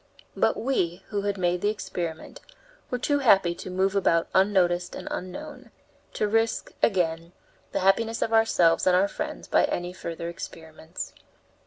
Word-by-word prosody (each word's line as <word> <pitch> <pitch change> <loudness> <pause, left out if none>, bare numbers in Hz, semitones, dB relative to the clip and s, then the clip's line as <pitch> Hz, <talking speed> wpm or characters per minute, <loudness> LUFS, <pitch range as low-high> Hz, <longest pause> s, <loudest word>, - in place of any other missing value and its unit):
But - - +2
we, 190 -8 -1
who 205 -2 -1
had 200 0 -2
made 180 -1 0
the 205 - +2
experiment, 175 -6 -5 0.5
were 250 - -1
too 285 +4 +1
happy 195 -9 +4
to 175 - -8
move 190 +2 0
about 165 -4 +2
unnoticed 185 -2 +2
and - - -8
unknown, 290 +12 -7 0.4
to 210 - 0
risk, 225 +2 0
again, 170 -4 +1 0.4
the - - -1
happiness 225 +4 +2
of 225 - -2
ourselves 185 -8 +4
and 180 - +5
our 190 +2 +4
friends - - -6
by - - +4
any 175 +1 -3
further 170 -2 -6
experiments. 160 0 -8
185 Hz, 155 wpm, -26 LUFS, 175-210 Hz, 0.5 s, and